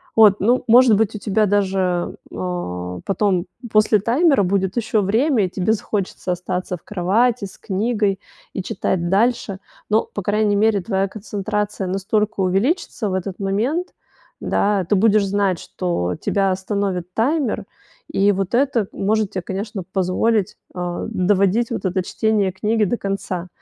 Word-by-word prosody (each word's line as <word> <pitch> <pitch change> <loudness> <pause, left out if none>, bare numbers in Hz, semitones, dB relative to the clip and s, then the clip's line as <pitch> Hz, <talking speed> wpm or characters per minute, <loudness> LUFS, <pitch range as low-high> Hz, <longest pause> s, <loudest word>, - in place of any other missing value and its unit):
Вот, 210 -2 +6
ну, 240 +6 +3
может 240 -1 +7
быть, 220 0 +1
у - - -4
тебя 210 +1 +1
даже, 190 -3 0 0.2
а, 90 - -4
потом 195 -2 +1 0.2
после 215 0 +4
таймера 265 - +3
будет 190 +2 0
ещё 220 -2 +1
время, 225 +3 +2
и - - -3
тебе 190 +4 0
захочется 200 -3 -3
остаться 180 +1 -3
в 160 - -28
кровати 210 +4 +1
с 190 - -11
книгой 205 -1 -1 0.3
и - - -3
читать 175 -1 -1
дальше, 205 0 +1 0.3
но, 215 +1 +3
по 205 - -3
крайней 205 +1 +1
мере, 210 -1 +3
твоя 195 0 0
концентрация 210 -1 -3
настолько 200 +3 -1
увеличится 210 - 0
в 185 - -1
этот 190 0 -4
момент, 230 - -1 0.5
да, 200 -2 +1
ты - - +3
будешь 210 0 +4
знать, 195 -2 +1
что 90 - -2
тебя 195 -1 +1
остановит 190 -2 -2
таймер, 270 +1 0 0.5
и 200 +1 +3
вот 195 +2 -1
это 250 -5 +2
может 215 +1 0
тебе, 185 -3 -4
конечно, 195 +1 -4
позволить, 195 +2 +1 0.2
э, 175 +1 -3
доводить 200 +3 +2
вот 230 - -3
это 185 0 +1
чтение 210 0 0
книги 210 +4 0
до 220 +5 -1
конца. 195 -3 -3
200 Hz, 150 wpm, -20 LUFS, 185-220 Hz, 0.5 s, может